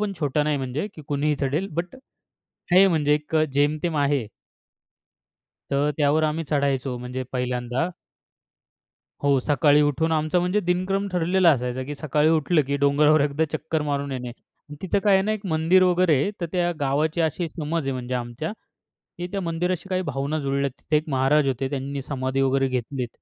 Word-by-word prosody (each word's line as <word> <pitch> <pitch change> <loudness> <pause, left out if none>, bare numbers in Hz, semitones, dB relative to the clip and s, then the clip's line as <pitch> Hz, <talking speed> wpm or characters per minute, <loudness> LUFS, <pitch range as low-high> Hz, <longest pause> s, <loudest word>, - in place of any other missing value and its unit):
पण 210 -1 -1
छोटा 150 0 +1
नाही 150 -1 0
म्हणजे 135 +7 -3
की 155 - -10
कुणीही 145 +1 +1
चढेल. 150 +8 -1
बट 170 - -4 0.8
आहे 190 +2 +7
म्हणजे 150 -4 +2
एक 150 +2 -2 0.2
जेमतेम 150 +3 +1
आहे. 140 -5 +1 1.4
तर 140 +2 +1
त्यावर 150 +1 +2
आम्ही 155 +1 -1
चढायचो 140 -3 0
म्हणजे 125 +1 -5
पहिल्यांदा. 125 +4 -1 1.3
हो. 140 -1 +3
सकाळी 145 +1 +3
उठून 150 +3 +1
आमचा 155 +2 +1
म्हणजे 180 +4 +1
दिनक्रम 185 +2 0
ठरलेला 180 +1 +3
असायचा 125 -2 -1
की 145 +2 -5
सकाळी 150 +1 +1
उठलं 160 +1 +3
की 140 0 0
डोंगरावर 150 +2 +4
एकदा 145 +2 +1
चक्कर 160 0 -2
मारून 140 -1 -2
येणे. 125 -1 -4
आणि 145 +4 -16
तिथं 190 +1 +1
काय 205 - +5
आहे 190 - +4
ना, 215 - 0
एक 215 -2 -5
मंदिर 165 +2 +3
वगैरे 180 -2 +3
आहे. 200 - 0
तर 170 - -1
त्या 175 -1 +1
गावाची 150 +4 0
अशी 165 +2 0
समज 160 +1 -3
आहे 135 - -1
म्हणजे 125 0 -4
आमच्या 125 - -4 0.7
की 175 0 -4
त्या 195 -1 -2
मंदिराशी 175 +2 -2
काही 185 0 0
भावना 140 +4 -2
जुळल्यात. 140 -1 -1
तिथे 150 - +1
एक 155 +1 -4
महाराज 135 +2 +2
होते. 135 0 -1
त्यांनी 140 0 -4
समाधी 130 0 -2
वगैरे 135 0 +2
घेतलीत. 130 0 -3
150 Hz, 175 wpm, -24 LUFS, 135-165 Hz, 1.4 s, आहे